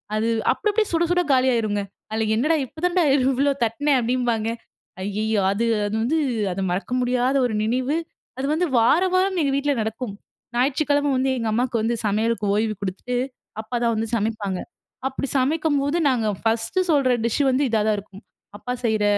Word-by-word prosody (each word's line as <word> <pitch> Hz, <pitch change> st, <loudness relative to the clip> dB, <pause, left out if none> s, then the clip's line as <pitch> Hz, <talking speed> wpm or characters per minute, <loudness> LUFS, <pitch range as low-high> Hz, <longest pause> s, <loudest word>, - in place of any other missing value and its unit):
அது 220 Hz, +1 st, 0 dB, 0.3 s
அப்டி, 415 Hz, -, -4 dB
அப்டியே 430 Hz, 0 st, +1 dB
சுட 335 Hz, 0 st, +2 dB
சுட 355 Hz, 0 st, +3 dB
காலியாயிருங்க. 230 Hz, -6 st, +2 dB, 0.3 s
"அதுல 220 Hz, 0 st, 0 dB
என்னடா 305 Hz, +8 st, +2 dB
இப்ப 315 Hz, +6 st, -13 dB
தான்டா 360 Hz, -1 st, +2 dB
இவ்வளோ 270 Hz, +2 st, +2 dB
தட்னேன்." 270 Hz, +5 st, +1 dB
அப்டீன்பாங்க. 235 Hz, -2 st, 0 dB, 0.5 s
ஐயயோ! 210 Hz, +1 st, 0 dB
அது, 225 Hz, +4 st, 0 dB, 0.2 s
அது 205 Hz, +1 st, -2 dB
வந்து 310 Hz, +7 st, +1 dB, 0.3 s
அது 195 Hz, -, -3 dB
மறக்க 180 Hz, +5 st, -3 dB
முடியாத 250 Hz, +2 st, +1 dB
ஒரு 230 Hz, -, -1 dB
நினைவு. 255 Hz, +6 st, 0 dB, 0.4 s
அது 265 Hz, -, -2 dB
வந்து 355 Hz, +3 st, +1 dB
வாரம், 335 Hz, +11 st, +4 dB
வாரம் 375 Hz, 0 st, +2 dB
எங்க 280 Hz, -2 st, +1 dB
வீட்ல 285 Hz, +1 st, +1 dB
நடக்கும். 220 Hz, 0 st, -4 dB, 0.4 s
ஞாயிற்றுக்கிழமை 285 Hz, +3 st, +1 dB
வந்து 265 Hz, +1 st, +1 dB
எங்க 230 Hz, -, -2 dB
அம்மாக்கு 245 Hz, 0 st, 0 dB
வந்து 230 Hz, +2 st, 0 dB
சமையலுக்கு 215 Hz, +1 st, 0 dB
ஓய்வு 215 Hz, 0 st, +1 dB
குடுத்துட்டு, 200 Hz, +6 st, -3 dB, 0.4 s
அப்பா 220 Hz, +3 st, -6 dB
தான் 230 Hz, -1 st, +2 dB
வந்து 225 Hz, +1 st, -1 dB
சமைப்பாங்க. 210 Hz, -4 st, -2 dB, 0.5 s
அப்டி 270 Hz, +1 st, -3 dB
சமைக்கும்போது 290 Hz, +2 st, +1 dB
நாங்க 230 Hz, -4 st, +1 dB, 0.2 s
ஃபர்ஸ்ட்டு 225 Hz, +11 st, 0 dB
சொல்ற 275 Hz, -4 st, +3 dB
டிஷ்ஷு 235 Hz, +5 st, +1 dB
வந்து 270 Hz, +3 st, +2 dB
இதா 220 Hz, -2 st, +2 dB
தான் 215 Hz, -, +2 dB
இருக்கும். 200 Hz, 0 st, -14 dB, 0.3 s
அப்பா 250 Hz, +4 st, -4 dB
செய்ற 220 Hz, -2 st, +1 dB
245 Hz, 165 wpm, -23 LUFS, 220-285 Hz, 0.5 s, வாரம்